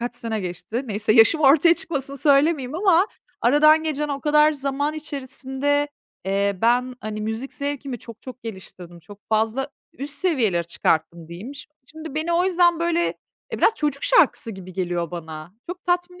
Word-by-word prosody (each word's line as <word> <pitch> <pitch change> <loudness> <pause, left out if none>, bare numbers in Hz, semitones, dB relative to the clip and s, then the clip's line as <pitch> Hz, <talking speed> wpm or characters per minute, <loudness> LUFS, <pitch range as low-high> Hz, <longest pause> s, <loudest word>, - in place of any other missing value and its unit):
kaç 240 0 -4
sene 225 -3 -3
geçti? 185 +7 -4
Neyse 215 0 +1
yaşım 235 +8 +5
ortaya 310 +4 +6
çıkmasın 280 -5 -3
söylemeyeyim 280 0 +2
ama 370 +1 +3 0.3
aradan 305 +5 +5
geçen 300 -1 -2
o 280 -1 -3
kadar 300 +1 +4
zaman 285 +1 -2
içerisinde, 285 -1 -2 0.4
eee, 200 0 0
ben, 250 +2 +2
hani, 215 0 -5
müzik 220 +5 -4
zevkimi 280 -3 -4
çok 230 0 -13
çok 255 -2 -10
geliştirdim, 185 -5 -10
çok 200 +5 -14
fazla 225 +5 0 0.3
üst 280 +2 -5
seviyelere 240 - +1
çıkarttım, 165 0 -1
diyeyim. 205 +12 -8
Şim 295 +1 -11 0.2
şimdi 315 0 -10
beni 315 +2 -1
o 345 +1 +3
yüzden, 350 -2 +3
böyle 340 0 +1 0.5
e, - - -3
biraz 450 - +4
çocuk 295 -5 -2
şarkısı - - +3
gibi 190 -3 -10
geliyor 175 -2 -2
bana. 160 +1 -8 0.2
Çok 360 0 -8
tatmin 360 0 -1
270 Hz, 165 wpm, -23 LUFS, 215-305 Hz, 0.5 s, ortaya